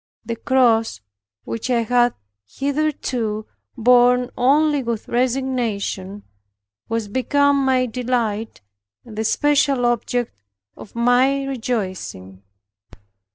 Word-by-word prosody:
The 230 - -3
cross, 230 - +2 0.4
which 230 +2 -5
I 240 -2 +2
had 240 +1 +2 0.3
hitherto 265 - -2 0.3
borne 245 +1 +4
only 290 +3 +3
with 235 -3 -4
resignation, 235 -6 -2 0.7
was 225 -2 -2
become 280 +5 +2
my 260 -1 +2
delight, 230 - -2 0.4
and 225 -3 -11
the 220 - -2
special 275 +1 +2
object 240 - -1 0.3
of 215 - -13
my 250 +4 +3
rejoicing. 190 - -4
245 Hz, 95 wpm, -21 LUFS, 225-260 Hz, 0.7 s, borne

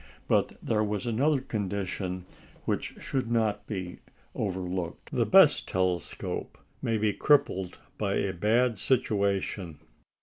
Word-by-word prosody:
But - - +2
there 110 -1 +1
was 105 +1 -2
another 135 +5 +2
condition 95 -5 -3 0.4
which - - -2
should 130 -4 -2
not 105 -3 +1
be 95 -4 -5 0.3
overlooked. 90 -3 -3
The - - +1
best - - +6
telescope 90 -1 -2 0.2
may 115 -1 +1
be 105 -1 +1
crippled 95 -11 +2 0.2
by 100 -2 0
a 100 -1 0
bad 110 +4 +2
situation. 100 - 0
100 Hz, 115 wpm, -28 LUFS, 95-115 Hz, 0.4 s, best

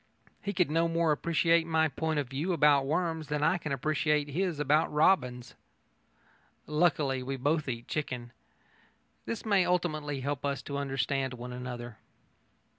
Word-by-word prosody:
He 200 - -2
could 180 -5 +1
no 165 +1 +2
more 165 -1 +1
appreciate 165 +2 +2
my 160 -1 +3
point 160 +2 -2
of 145 -3 -1
view 145 +8 -2
about 145 -4 +4
worms 160 0 -1
than 150 0 -1
I 175 +3 +3
can 155 - -5
appreciate 150 +1 0
his 170 +1 -1
about 150 +2 +2
robins. 125 -6 +2 1.1
Luckily, 150 -4 +1
we 135 +2 -3
both 145 +2 0
eat 120 -1 -5
chicken. 125 -5 -4 0.9
This 230 - -4
may 200 -4 +4
ultimately 155 -6 -1
help 140 0 -3
us 140 -1 -2
to 140 0 -4
understand 135 -1 -1
one 125 +1 -7
another. 120 -2 -7
150 Hz, 150 wpm, -30 LUFS, 135-165 Hz, 1.1 s, about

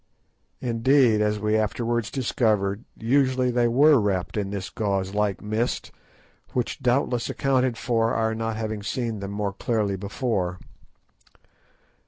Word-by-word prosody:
Indeed, 120 -1 +3
as 105 0 +1
we 105 +1 +1
afterwards 115 +2 0
discovered, 110 -5 0
usually 130 +1 +2
they 120 0 +2
were 140 +4 +5
wrapped 100 -4 -1
in 100 -2 -1
this 100 -1 -5
gauze 100 -2 -1
like 105 -1 0
mist, 110 +3 -2 0.6
which 125 +3 -2
doubtless 125 -1 +1
accounted 130 -3 +1
for 115 -2 +1
our 110 -1 +1
not 115 0 -2
having 110 -1 -3
seen 115 +1 -3
them 100 0 -5
more 100 0 -2
clearly 105 -2 -1
before. 100 -3 -2
110 Hz, 130 wpm, -25 LUFS, 105-125 Hz, 0.6 s, were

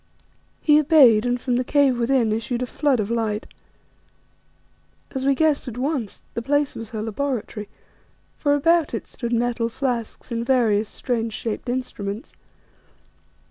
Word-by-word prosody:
He 300 -1 +6
obeyed, 265 -7 +6
and 245 0 0
from 245 -1 0
the 250 - +1
cave 275 -2 +3
within 235 -2 +2
issued 235 +3 -2
a - - 0
flood 270 0 +1
of 210 +1 -2
light. 220 -2 -1 1.7
As 265 0 -3
we 275 - +4
guessed 305 -2 +1
at 245 -1 -6
once, 260 -5 -3
the 230 - -3
place 285 +3 +1
was 225 -2 -7
her 220 -2 -4
laboratory, 220 -3 -3 0.7
for 290 -1 +2
about 330 +2 +2
it - - -5
stood 235 -2 -6
metal 235 0 0
flasks 240 -1 -3
and 230 0 -1
various 225 -5 +2
strange 230 -3 -2
shaped 225 +2 -4
instruments. 225 -4 -4
245 Hz, 145 wpm, -23 LUFS, 225-275 Hz, 1.7 s, He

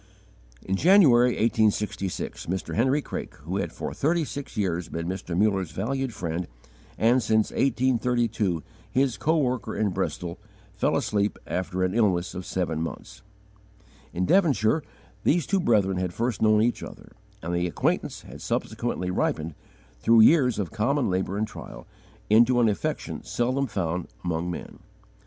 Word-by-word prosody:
In 95 - -1
January, 130 - +6
1866, 105 -3 0
Mr. 95 +2 -3
Henry 130 +6 +2
Craik, - - -6
who 90 +5 -3
had - - -2
for - - -5
thirty 160 +2 +1
six 140 -4 -7
years 90 -4 -1
been 85 0 -4
Mr. 90 -2 -4
Muller's 95 -3 +2
valued 130 +8 -2
friend, 85 -3 -4 0.5
and, 120 +3 +4
since 110 -1 +2
1832, 120 - +1 0.3
his 130 -2 +1
coworker 130 -8 0
in 105 - +1
Bristol, 85 0 -3 0.3
fell 105 - +1
asleep 105 0 0
after 90 0 -2
an 90 0 0
illness 95 -7 +1
of 90 -1 -6
seven 85 -4 -1
months. 85 - -7 0.9
In 90 +1 -1
Devonshire 155 - +3 0.4
these 165 -1 +2
two 195 - +1
brethren 100 - +2
had 90 -1 -2
first 120 -1 -1
known 110 0 +4
each 120 - 0
other, - - -10 0.3
and 85 +2 -3
the 90 0 +1
acquaintance 85 - -1
had - - -11
subsequently 90 0 -2
ripened, 80 -2 -1 0.5
through 115 - +5
years 125 -1 +5
of 95 -5 -3
common 120 +2 +1
labour 95 +1 -1
and 110 +1 0
trial, - - -10 0.4
into 120 +3 +5
an 120 - +4
affection 100 - -3
seldom 130 +3 0
found 90 -5 -2 0.2
among 85 0 -1
men. 85 - -7
105 Hz, 145 wpm, -26 LUFS, 90-125 Hz, 0.9 s, January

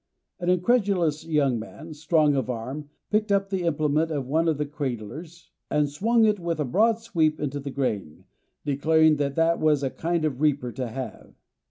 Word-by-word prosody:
An 175 0 -1
incredulous 180 -5 +2
young 140 -7 +2
man, 155 +8 -9
strong 155 -1 +2
of 130 -3 -1
arm, 130 +5 -5 0.2
picked 215 0 +1
up 195 0 +1
the 190 -1 0
implement 155 0 +1
of 145 -4 -2
one 160 +5 +1
of 160 -3 +1
the 150 - -1
cradlers, 145 - -6 0.2
and 150 -1 +2
swung 225 +9 +3
it 210 -2 +2
with 170 -2 -2
a 150 - 0
broad 215 - +3
sweep 165 -9 0
into 145 -1 -3
the 140 0 -6
grain, 105 - -3 0.4
declaring 155 +2 +3
that 140 -1 -1
that 165 +1 +2
was 150 -2 +2
a 135 - -1
kind 170 -1 -1
of 155 - 0
a - - -13
reaper 145 -4 +1
to 130 0 -4
have. 130 +3 -7
155 Hz, 190 wpm, -25 LUFS, 140-170 Hz, 0.4 s, swung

